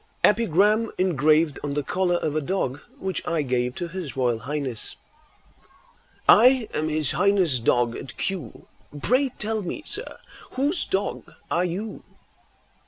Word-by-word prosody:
EPIGRAM, 210 +1 +3
ENGRAVED 155 -3 +2
ON 145 -1 -3
THE 145 - 0
COLLAR 180 +4 0
OF 155 -3 -1
A 155 - +1
DOG 145 -4 -2 0.2
WHICH 190 -1 -2
I 165 -3 0
GAVE 125 -1 -1
TO 175 - -3
HIS 165 -7 -6
ROYAL 120 -3 +1
HIGHNESS. 135 -2 -3 1.3
I 250 +1 +6
am 155 +1 -1
His 155 -3 +1
Highness' 185 -8 +3
dog 120 0 +2
at 130 - -8
Kew; 190 -4 -4 0.3
Pray 260 - +2
tell 220 0 -1
me, 200 - -5
sir, - - -4 0.4
whose 290 +7 0
dog 195 +1 -3 0.2
are 175 +2 +2
you? 195 +5 -5
170 Hz, 140 wpm, -24 LUFS, 140-205 Hz, 1.3 s, I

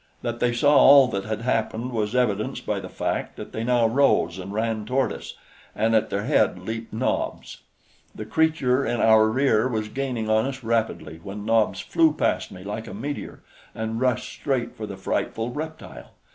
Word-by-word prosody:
That 120 -1 -3
they 120 - +2
saw 145 +5 +3
all 135 -1 +8
that 100 -4 -3
had 110 0 -3
happened 115 0 -1
was 110 -1 -2
evidenced 110 -5 0
by - - -1
the - - -8
fact - - -3
that - - -9
they 110 - -4
now 120 -1 +3
rose 110 -8 +2
and 95 +2 -7
ran 110 0 -1
toward 130 +5 0
us, - - -9 0.4
and 115 +1 +1
at 110 - +2
their 100 +1 -2
head - - +2
leaped 110 0 -6
Nobs. 115 +4 -2 0.6
The 110 - -6
creature 140 -1 +1
in 120 -1 -1
our 110 -1 +5
rear 125 -1 +2
was 110 -4 -2
gaining 130 -4 -3
on 110 +2 +2
us 135 -1 -6
rapidly 110 -8 -2
when 100 +3 -7
Nobs 110 -4 +2
flew 160 -2 +3
past - - -1
me 95 -1 -10
like 105 +3 -5
a 95 - -7
meteor 140 +7 -6 0.3
and 110 +1 -3
rushed 125 -1 0
straight 135 -4 -2
for 110 - -6
the 100 - -7
frightful 115 +4 -2
reptile. 155 +4 -8
115 Hz, 185 wpm, -24 LUFS, 110-130 Hz, 0.6 s, all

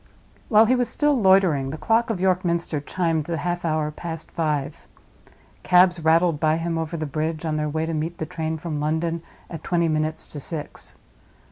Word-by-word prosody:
While 220 0 +6
he 240 - +3
was 250 -1 +1
still 295 0 +2
loitering, 190 -8 +4
the 155 - -5
clock 230 +6 +1
of 220 -5 -1
York 185 0 +2
Minster 170 -3 -1
chimed 165 0 -1
the 170 0 -3
half 175 +3 -2
hour 155 -2 0
past 160 0 -7
five. 150 -3 -2 0.7
Cabs 180 -1 +4
rattled 165 0 +3
by 155 0 +2
him 165 0 -2
over 160 +1 -3
the 155 - -3
bridge 155 +2 -3
on 155 -1 -1
their 150 0 -1
way 160 +2 -1
to 165 - -3
meet 160 +2 -3
the 160 - -3
train 160 -1 -3
from 160 -2 -4
London, 160 +2 -1 0.3
at 165 - -8
twenty 170 -1 +1
minutes 155 0 -1
to 145 - -6
six. 150 +1 -5
165 Hz, 195 wpm, -23 LUFS, 155-175 Hz, 0.7 s, While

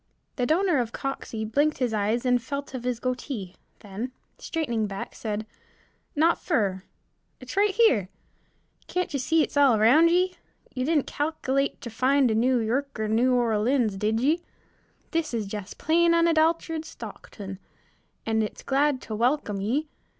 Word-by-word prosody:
The 250 -2 0
donor 345 -2 +3
of 235 -2 -1
Coxey 235 -5 -4
blinked 290 +8 +1
his 245 -4 0
eyes 215 +4 0
and 250 -1 +3
felt 280 +2 -5
of 250 -2 -5
his 250 -2 -1
goatee, 250 -6 -4 0.3
then, 210 +5 -5 0.3
straightening 235 -10 -2
back, 195 -1 -6
said, 215 -1 -4 0.7
"Not 325 +3 +3
fer, 195 - 0 0.5
it's 255 +5 -8
right 410 +1 +4
here. 375 - +3 0.8
Can't 360 -3 -2
you 280 - 0
see 320 +5 +3
it - - -5
all 275 -5 +5
round 265 +11 +6
ye? 365 +2 +2 0.4
Ye 255 -1 -2
didn't 305 -2 +2
cal'luate 280 -2 -1
ter 235 - -7
find 260 +2 +3
a - - +2
New 250 +4 +3
Yirk 255 +5 -1
er 215 - 0
New 240 +4 +3
Orlins, 230 -1 +2
did 215 +3 0
ye? 305 +7 +2 0.7
This 320 -6 -1
is 220 -3 -1
jest 200 -1 -7
plain 335 +2 +3
unadulterated 325 -1 +2
Stockton, 195 -10 -9 0.7
and 220 0 +1
it's 215 - -4
glad 280 -1 +1
ter 220 - -6
welcome 230 -3 0
ye. 265 +10 0
255 Hz, 155 wpm, -26 LUFS, 220-305 Hz, 0.8 s, round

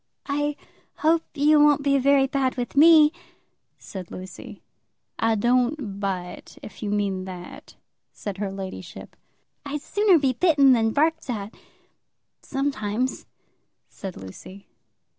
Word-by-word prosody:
"I 290 +1 -1 0.5
hope 325 +1 +4
you 300 +1 +4
won't 295 -1 +4
be 280 -1 +3
very 275 0 +4
bad 265 -1 -1
with 245 0 -4
me," 305 0 +7 0.7
said 185 -3 -9
Lucy. 185 +1 -10 0.6
"I 225 0 +2
don't 240 -1 0
bite, 185 -3 -5
if - - -11
you 210 - -3
mean 200 -2 -1
that," 180 -1 -10 0.4
said 200 -2 -7
her 200 -2 -2
ladyship. 190 -2 -8 0.5
"I'd 290 +1 -5
sooner 410 -2 +3
be 270 -4 +1
bitten 280 -2 +4
than 225 -2 +2
barked 315 +4 0
at, 215 -3 -4 0.9
sometimes," 255 -4 -2 0.6
said 190 -3 -8
Lucy. 140 - -11
255 Hz, 120 wpm, -24 LUFS, 200-290 Hz, 0.9 s, me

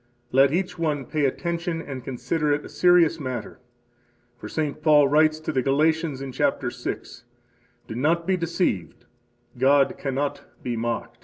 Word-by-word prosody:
Let 135 +1 +5
each 180 +1 -2
one 150 -5 -1
pay 150 +3 0
attention 170 +4 -2
and 135 -5 -7
consider 135 +5 -1
it 145 +1 0
a - - -9
serious 175 -2 +4
matter; 130 -6 -5 0.8
for - - -9
St. 155 -1 -3
Paul 150 -2 +5
writes 155 +2 +3
to - - -3
the 130 - +1
Galatians 150 +1 +1
in 135 - -6
chapter 135 -2 0
six: - - -6 0.6
"Do - - -6
not 160 +8 +1
be 190 +1 +2
deceived: 170 - -2 0.5
God 135 +1 +3
cannot 140 +1 -2 0.2
be 120 -1 -2
mocked." 115 0 -3
145 Hz, 155 wpm, -24 LUFS, 130-165 Hz, 0.8 s, Let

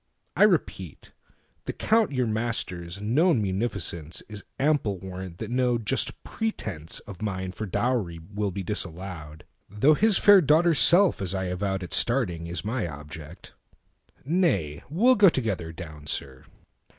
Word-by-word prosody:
I - - +6
repeat, - - -1 0.5
The - - -3
Count 220 -4 +2
your 130 -2 0
master's 110 -6 -3
known 130 - +3
munificenceIs 100 -2 -3 0.2
ample 135 -9 +1
warrant 95 -1 -8
that - - -6
no 125 -1 +2
just 115 -3 -2
pretenceOf 100 - -5
mine 95 -3 -3
for 100 +4 -6
dowry 105 -4 -1 0.2
will 105 0 -1
be 95 +1 -5
disallowed; 85 -5 -6 0.3
Though 125 +10 +4
his 210 +5 +4
fair 205 -2 +7
daughter's 160 0 +4
self, 175 - +5
as 95 0 -2
I 95 -1 -2
avowedAt 95 -1 -3
starting, 95 -10 0
is 85 +3 -5
my 110 -3 -1
object. 75 +2 -10 0.7
Nay, 145 - +1
we'll 230 - +4
goTogether 110 - +2
down, 80 -4 -9
sir. 65 -3 -4
100 Hz, 130 wpm, -26 LUFS, 85-130 Hz, 0.7 s, fair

